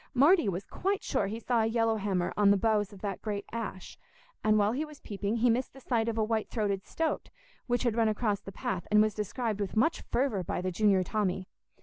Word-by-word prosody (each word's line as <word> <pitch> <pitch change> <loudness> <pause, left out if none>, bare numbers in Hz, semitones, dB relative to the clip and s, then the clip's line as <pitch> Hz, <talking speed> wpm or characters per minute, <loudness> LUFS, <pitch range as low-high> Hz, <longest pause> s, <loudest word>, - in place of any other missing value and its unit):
Marty 290 - +5
was 185 +1 -3
quite 395 +2 -2
sure - - 0
he 220 +3 -4
saw 235 0 +1
a 220 - +2
yellow 225 -1 +1
hammer 195 -4 -1
on 205 -1 +4
the 200 - +5
boughs 210 0 +1
of 200 -2 -13
the 200 -3 -3
great 205 -2 -3
ash, 220 -5 -6 0.4
and 215 0 +4
while 205 0 +3
he 270 +6 -1
was 300 -2 -10
peeping, 205 +1 -3
he 235 +1 +3
missed 250 +3 -1
the 270 - -12
sight 230 -3 0
of 225 - -3
a 220 - +2
white 220 0 -1
throated 200 -4 -1
stoat, 325 -1 -2 0.4
which 245 0 +1
had 240 -3 +1
run 230 -1 +3
across 215 -1 0
the 195 - -9
path 185 -2 -3
and 210 - +5
was 215 -1 0
described 215 0 -2
with 200 +2 -3
much 320 +9 +2
fervour 240 -8 0
by - - -2
the 185 +1 -2
junior 195 0 +3
Tommy. 190 -2 -1
215 Hz, 235 wpm, -30 LUFS, 200-235 Hz, 0.4 s, Marty